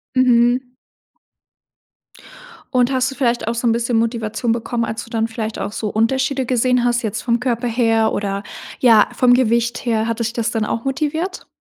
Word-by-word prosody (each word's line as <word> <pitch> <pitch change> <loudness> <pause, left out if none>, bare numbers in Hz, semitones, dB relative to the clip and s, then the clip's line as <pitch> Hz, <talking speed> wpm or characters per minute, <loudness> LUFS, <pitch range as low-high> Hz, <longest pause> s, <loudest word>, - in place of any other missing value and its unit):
Mhm. 250 0 +3 2.0
Und 250 +1 +3
hast 260 0 +1
du - - -9
vielleicht 240 -4 0
auch 230 - -1
so 235 +1 -1
'n - - +4
bisschen 235 +1 0
Motivation 230 0 -1
bekommen, 230 0 -1
als 225 +1 -5
du - - -14
dann 225 -1 -1
vielleicht 225 -2 -5
auch 200 - -3
so 215 0 -3
Unterschiede 265 +5 0
gesehen 250 0 +1
hast 240 0 +1
jetzt 215 -3 -3
vom 235 -1 0
Körper 245 -1 -1
her, 225 -2 +2
oder, 200 0 -2 0.4
ja, 225 -4 +5
vom 250 -1 +4
Gewicht 235 -1 +1
her? 225 -1 0
Hat 230 0 -2
dich 230 0 -2
das 230 -1 -1
dann 225 -2 -1
auch 230 +2 -3
motiviert? 315 +6 -2
235 Hz, 180 wpm, -19 LUFS, 225-250 Hz, 2.0 s, ja